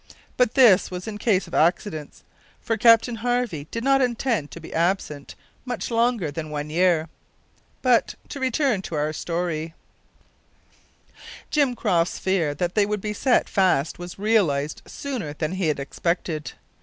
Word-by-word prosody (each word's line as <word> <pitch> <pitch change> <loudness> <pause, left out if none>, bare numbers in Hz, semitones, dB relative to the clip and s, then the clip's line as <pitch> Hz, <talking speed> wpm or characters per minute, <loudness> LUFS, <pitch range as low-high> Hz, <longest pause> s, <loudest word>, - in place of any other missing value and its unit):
But 250 -2 +2
this 230 -8 +6
was 180 +1 -6
in 210 -1 -5
case 205 -4 +2
of - - -14
accidents, 160 -2 0 0.4
for 225 - -1
Captain 230 +1 +5
Harvey 235 -10 -1
did 230 - -4
not 270 0 +4
intend 235 - 0
to - - -9
be 160 - -10
absent 165 -4 -1 0.3
much 245 -1 -4
longer 230 -8 +1
than 155 +1 -5
one 150 0 -4
year. 170 -1 +2 0.8
But, 250 -3 +3
to 280 - -6
return 260 -4 +1
to 170 - -6
our 150 +1 -1
story: 165 -1 -3 1.8
Jim 280 -5 +2
Croft's 180 -7 +1
fear 175 -6 0
that 175 +3 -2
they 205 -2 +3
would 210 -1 -2
be 210 +1 -3
set 250 +4 +2
fast 180 -7 +1
was 175 0 -8
realised 180 -9 +1
sooner 245 - -5
than 155 +1 -3
he 185 -3 0
expected. 155 +2 -2
185 Hz, 150 wpm, -24 LUFS, 160-230 Hz, 1.8 s, this